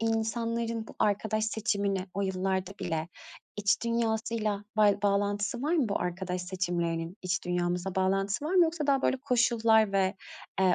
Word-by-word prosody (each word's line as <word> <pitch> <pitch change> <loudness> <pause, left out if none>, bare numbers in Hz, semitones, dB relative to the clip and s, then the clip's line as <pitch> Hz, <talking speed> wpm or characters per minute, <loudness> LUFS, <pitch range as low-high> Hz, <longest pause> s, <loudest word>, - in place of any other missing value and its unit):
insanların 225 0 -1
bu - - -11
arkadaş 215 +1 +1
seçimini 200 -3 -1
o 200 - -1
yıllarda 190 0 -1
bile 160 0 -2 0.5
iç 205 -1 +1
dünyasıyla 220 -2 -1
bay 205 -1 +4
bağlantısı 205 +3 0
var 315 +4 +1
mı 280 -9 +2
bu 200 - -1
arkadaş 180 0 -3
seçimlerinin? 175 -1 -2
İç 180 -1 -1
dünyamızda 180 +1 -1
bağlantısı 195 +6 0
var 340 +5 -1
mı, 360 - +7
yoksa 320 -2 -2
daha, 275 -1 +3
böyle, 265 - +2
koşullar 230 -4 +3
ve, 190 0 +2 0.5
eee, 185 -2 +4
205 Hz, 150 wpm, -29 LUFS, 185-230 Hz, 0.5 s, mı